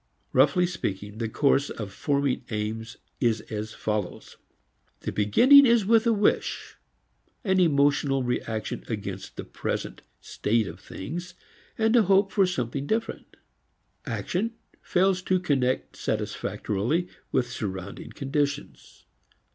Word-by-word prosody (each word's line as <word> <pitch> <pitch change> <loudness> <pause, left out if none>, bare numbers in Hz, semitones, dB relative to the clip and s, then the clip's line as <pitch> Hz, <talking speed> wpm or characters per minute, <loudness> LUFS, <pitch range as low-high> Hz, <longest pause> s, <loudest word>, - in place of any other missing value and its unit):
Roughly 145 +7 +4
speaking, 105 - -4
the 115 -2 -2
course 140 +3 +2
of 105 -3 -6
forming 140 +1 0
aims 110 +1 -4 0.2
is 115 -3 +2
as 110 +1 -4
follows. 105 -4 -3 0.7
The - - -3
beginning 255 - +6
is 230 -3 +4
with 225 +2 +4
a - - +5
wish, 210 -2 0 0.7
an 190 -2 +2
emotional 140 -4 +3
reaction 115 -3 -3
against 100 -4 -5
the - - -5
present - - -4 0.2
state 110 +1 0
of - - -8
things 175 - -7 0.4
and 220 +1 +3
a 235 - +7
hope 195 0 +3
for 195 -2 +3
something 140 -4 -3
different. 225 +1 -3 0.7
Action 225 +6 -2 0.3
fails 185 0 +2
to 185 0 +1
connect 135 -7 0
satisfactorily 120 - -2 0.2
with 125 -2 0
surrounding 95 -3 -5
conditions. 145 0 -3
140 Hz, 120 wpm, -26 LUFS, 110-185 Hz, 0.7 s, a